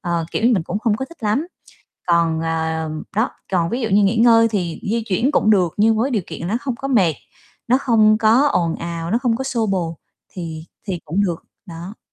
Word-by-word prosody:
ờ, 170 -2 -2
kiểu - - -2
như, 240 - +5
mình 185 - 0
cũng 205 - -3
không 215 -1 +1
có 265 - -3
thích 325 -1 -17
lắm. 220 +10 0 0.6
Còn, 165 -2 +2
ờ 160 -1 -2 0.3
đó, 220 +4 +2 0.2
còn 170 -2 +1
ví 245 - -2
dụ 225 - 0
như 205 0 +4
nghỉ 200 +4 +2
ngơi 230 0 +5
thì 180 -6 -2
di 230 0 0
chuyển 230 +8 +1
cũng 215 - +3
được 180 -6 +3
nhưng 220 +1 +3
với 250 +5 +1
điều 220 -7 0
kiện 170 - -6
nó 220 - 0
không 255 0 -3
có 275 +3 -5
mệt, 190 - +3 0.5
nó 255 +2 +4
không 215 -5 +4
có 230 +6 +4
ồn 170 - 0
ào, 170 0 -5
nó 230 - +2
không 240 -3 0
có 265 - -4
xô 235 -4 -1
bồ 170 -5 -2 0.3
thì 165 -3 -7 0.2
thì 180 -3 -3
cũng 190 +7 0
được, 170 -3 -3 0.2
đó. 175 +4 -9
205 Hz, 230 wpm, -20 LUFS, 170-230 Hz, 0.6 s, như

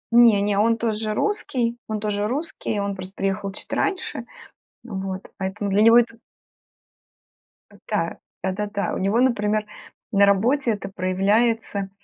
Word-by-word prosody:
Не, 230 -4 +7
не, 200 -1 +1
он 225 +2 +3
тоже 220 -1 -1
русский, 250 - 0
он 215 -1 -2
тоже 205 0 -1
русский, 260 -4 -3
он 200 0 -2
просто 185 +1 -8
приехал 195 0 -1
чуть 195 - -10
раньше. 305 - -2 0.5
Вот, 190 -4 -5
поэтому 200 +2 -3
для 200 +2 +3
него 230 +2 +8
это 230 -1 -1 1.7
Да, - - -1 0.3
да-да-да. 205 +2 -2
У - - -2
него, 200 +5 +1
например, 215 -4 +2 0.5
на 200 -1 +5
работе 235 +7 +3
это 200 -2 -4
проявляется 200 +2 +1
210 Hz, 135 wpm, -23 LUFS, 200-230 Hz, 1.7 s, него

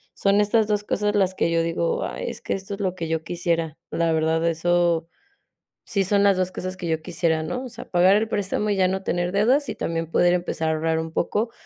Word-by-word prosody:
Son 200 +1 +3
estas 215 +1 +2
2 210 -1 0
cosas 210 0 -1
las 190 -2 +2
que 170 - +1
yo 165 0 +2
digo: 165 0 -1
"Ay, - - -4
es - - -9
que - - -2
esto 195 +1 -5
es 200 - -6
lo 185 -2 -1
que 170 -3 -4
yo 160 0 -1
quisiera", 165 -2 -2
la 165 -1 +1
verdad, 160 +1 +1
eso 170 0 +1 0.8
si 200 - +1
son 200 +1 +2
las 200 -1 +5
2 185 0 0
cosas 185 0 -5
que 175 -2 -5
yo 160 -1 -1
quisiera, 165 -2 0
¿no? 250 +11 -4
O - - -7
sea, 240 - -9
pagar 180 +2 +5
el 220 +2 +1
préstamo 205 0 -1
y - - +1
ya 185 -1 +3
no 190 +1 -2
tener 175 0 -1
deudas 250 +8 +2
y 220 - -3
también 165 -1 -3
poder 175 +1 +3
empezar 175 -2 -1
a - - +2
ahorrar 160 +1 0
un 160 0 -4
poco 210 +7 -1
180 Hz, 240 wpm, -23 LUFS, 165-200 Hz, 0.8 s, las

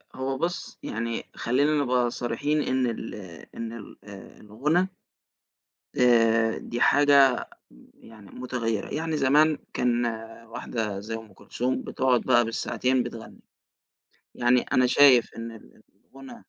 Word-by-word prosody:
هو 130 +1 -3
بُصّ 170 +5 -4
يعني 115 +1 -3
خلّينا 145 +5 +1
نبقى 125 -2 +1
صريحين 145 +6 -1
إن 130 -2 0
ال 115 -1 -5 0.4
إن 115 0 -5
ال 110 -3 -11
آآ 100 -2 -13
الغُنا 150 - 0 1.1
آآ 115 -2 +3
دي 120 - -6
حاجة 140 -3 +4 0.5
يعني 110 -3 -16
متغيِّرة. 115 -4 -3
يعني 160 +1 -2
زمان 150 +2 +3 0.2
كان 120 -1 +1 0.4
واحدة 110 -3 -4
زي 110 +3 -6
أم 110 -2 -8
كلثوم 125 +6 -3
بتقعد 130 -2 +1
بقى 120 -2 +3
بالساعتين 125 +3 0
بتغني. 120 -2 -9 0.9
يعني 125 +1 +3
أنا 130 - +2
شايف 130 -2 +5
إن 115 0 -6
ال 115 - -16 0.2
الغُنا 135 0 -12
125 Hz, 125 wpm, -26 LUFS, 115-135 Hz, 1.1 s, شايف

